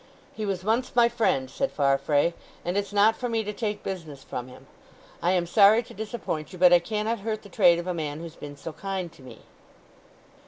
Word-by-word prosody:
"He 215 -1 -4
was 190 -2 -2
once 230 +5 0
my 240 -1 +6
friend," 225 - +1
said 270 - -2
Farfrae, 145 +3 +2 0.3
"and 175 +2 -1
it's 200 0 -1
not 205 +2 +4
for 245 - -3
me 225 -1 0
to 210 0 -4
take 210 -1 -3
business 160 -8 -6
from 125 0 -6
him. 125 - -14 0.6
I 175 +2 +2
am 180 -2 +1
sorry 205 +6 +6
to - - -13
disappoint 205 -8 -5
you, 185 - -9
but 180 0 +6
I 175 - +8
cannot 215 +5 -2
hurt 215 +1 -3
the 200 - -12
trade 170 -1 +5
of 170 - -4
a 180 - -1
man 155 -3 -4
who's 165 -1 -8
been 145 -1 -9
so 160 +3 -7
kind 190 -2 -4
to 160 - -18
me." 130 - -12
185 Hz, 220 wpm, -26 LUFS, 160-215 Hz, 0.6 s, I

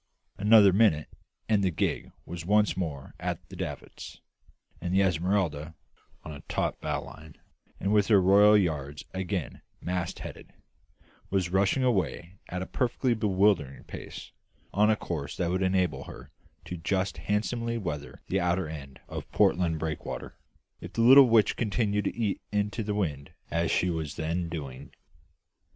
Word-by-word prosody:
Another 105 -1 +7
minute 95 -8 +3 0.4
and 105 -2 +2
the 95 - +3
gig 80 - -2
was 85 -2 -6
once 105 +3 +3
more 75 -7 -4
at - - -4
the - - -10
davits; - - -7 0.6
and 90 +1 -1
the 95 - +5
Esmeralda, 85 -3 0 0.5
on 80 - -7
a 70 -2 -8
taut - - -1
bowline, 80 -1 -5 0.4
and 100 +3 0
with 105 -2 +4
her 105 -3 +6
royal 100 +3 +6
yards 75 -6 -2
again 95 -2 -3 0.2
mast 90 -1 -3
headed, - - -9 0.8
was 95 -3 0
rushing 100 +7 +2
away 95 -6 -1
at 90 +1 -3
a - - -5
perfectly 125 +1 0
bewildering 100 - +1
pace, - - -9 0.4
on 105 +3 +4
a 110 - +4
course 80 -8 -5
that 85 -1 0
would 95 +1 0
enable 95 -1 +1
her - - -11 0.3
to 90 - -5
just 95 +2 -1
handsomely 115 +5 -1
weather 75 -9 -5
the 95 - 0
outer 90 -1 0
end 70 -4 -9
of - - -7
Portland 85 -3 +2
breakwater, 80 -1 -5 0.4
if - - -9
the 115 - 0
little 130 +2 +9
witch 115 -2 +4
continued 105 -2 0
to - - -1
eat 110 -4 -1
into 105 +2 -1
the 105 -1 -2
wind 75 -9 -3 0.2
as 85 0 +1
she 90 - +2
was 80 -3 -4
then 85 +2 -2
doing. 70 -3 -7
95 Hz, 155 wpm, -28 LUFS, 80-105 Hz, 0.8 s, little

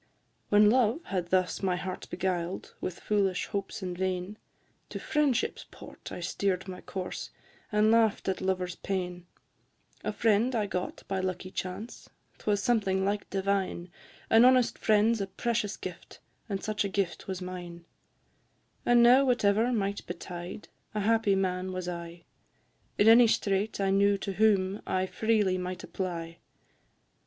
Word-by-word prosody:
When 210 0 +6
love 245 +2 +3
had 180 -3 -3
thus 185 0 +1
my 185 -2 +1
heart 185 +1 -5
beguiled 180 -1 -3
With 185 - -4
foolish 195 -3 +1
hopes 200 0 -4
and 180 -1 -3
vain; 185 +2 -3 0.5
To - - -5
friendship's 295 -5 0
port - - -11
I - - -6
steer'd 190 +1 -1
my 185 -1 -7
course, 185 -1 -5 0.4
And 210 +1 +4
laugh'd 225 -2 +3
at 190 -1 -1
lovers' 185 -2 -1
pain; 180 -2 -4 0.8
A - - -1
friend 230 +3 +2
I 215 -2 +1
got 180 -2 -4
by 190 -1 -1
lucky 185 0 -3
chance, 190 +5 -6 0.3
'Twas 205 -1 0
something 195 -5 +1
like 200 +1 -2
divine, 190 -2 -1 0.4
An 225 +1 +7
honest 255 -1 +5
friend 215 +1 +4
's 215 - -4
a 195 - -2
precious 210 +2 -2
gift, 180 -2 -8 0.3
And 195 -2 -3
such 215 -1 -1
a 200 - -2
gift 190 -3 -2
was 190 -1 -3
mine; 175 -2 -7 1.0
And 240 0 +5
now 250 +3 +7
whatever 235 -2 +2
might 200 -3 -2
betide 175 +2 -7 0.3
A 210 - 0
happy 220 -1 +3
man 185 -1 -1
was 185 -1 -4
I, 170 -1 -6 0.7
In 205 - +4
any 230 +1 +8
strait 205 -1 0
I 195 -1 +1
knew 200 +1 +4
to 195 0 -4
whom 200 -1 +2
I 185 0 +1
freely 205 -2 +1
might 180 0 -5
apply. 170 -3 -5
195 Hz, 150 wpm, -29 LUFS, 185-215 Hz, 1.0 s, any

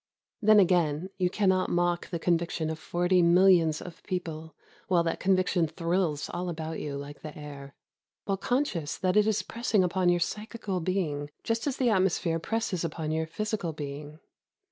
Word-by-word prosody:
Then 215 -1 +6
again 175 -2 +2
you 180 -1 +2
cannot 190 -1 +2
mock 175 0 0
the 170 - -2
con 170 +1 +2
viction 165 -1 -2
of 160 - -6
forty 175 +3 +2
millions 170 -2 +5
of 175 - -10
people 160 -4 -5 0.3
while 175 -3 +3
that 165 - -2
conviction 185 -2 +2
thrills 165 -3 -1
all 180 +1 -3
about 160 -1 -4
you 145 -2 -4
like 140 +1 -8
the 155 -1 -8
air, 140 -2 -9 0.2
— - - -65
while 195 - 0
conscious 195 - -1
that 185 -1 0
it 210 0 +5
is 215 -1 +1
pressing 230 -4 +1
upon 180 0 +1
your 175 0 +3
psychical 210 +1 -3
being 160 -5 -2
just 230 +4 -1
as 275 - -1
the 250 -2 +2
atmos 190 -4 +3
phere 165 -1 -1
presses 210 -2 -2
upon 155 -1 -3
your 160 0 -1
physical 200 0 -3
being. 145 0 -7
175 Hz, 180 wpm, -28 LUFS, 160-190 Hz, 0.3 s, Then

